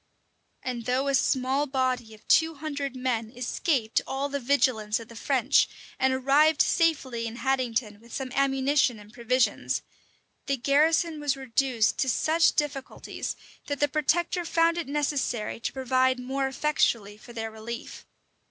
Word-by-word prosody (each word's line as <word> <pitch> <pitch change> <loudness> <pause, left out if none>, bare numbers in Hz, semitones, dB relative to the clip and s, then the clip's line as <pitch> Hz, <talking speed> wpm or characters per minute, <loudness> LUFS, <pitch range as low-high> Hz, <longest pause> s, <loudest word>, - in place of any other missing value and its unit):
[*] - - -45
And 240 -3 -4
though 260 +3 +1
a - - +1
small 265 +2 +1
body 255 -4 -1
of 215 - -23
two 325 0 +4
hundred 285 -2 -4
men 245 -3 -1
escaped 250 -1 0
all 275 +1 -2
the 280 0 -2
vigilance 240 -5 +1
of 230 - -11
the 235 - -12
French, - - +2 0.3
and 265 0 +3
arrived 280 +4 +4
safely 265 -8 +1
in 225 - -7
Haddington 240 -4 -1
with 235 +1 -18
some 265 -2 -4
ammunition 270 -2 +2
and 210 +1 -15
provisions, 235 - 0 0.6
the 275 -1 +1
garrison 310 +5 +2
was 290 -2 0
reduced 255 -3 +1
to 265 - +1
such 320 +6 +3
difficulties, 280 -3 -3 0.3
that 285 -1 -3
the 290 - +3
protector 330 +5 0
found 335 0 +2
it 335 - -4
necessary 275 -7 -1
to - - -3
provide 260 -1 +1
more 265 +2 -1
effectually 245 -7 0
for 220 +3 -14
their 225 -1 -4
relief. 225 +2 -8
265 Hz, 150 wpm, -27 LUFS, 235-285 Hz, 0.6 s, two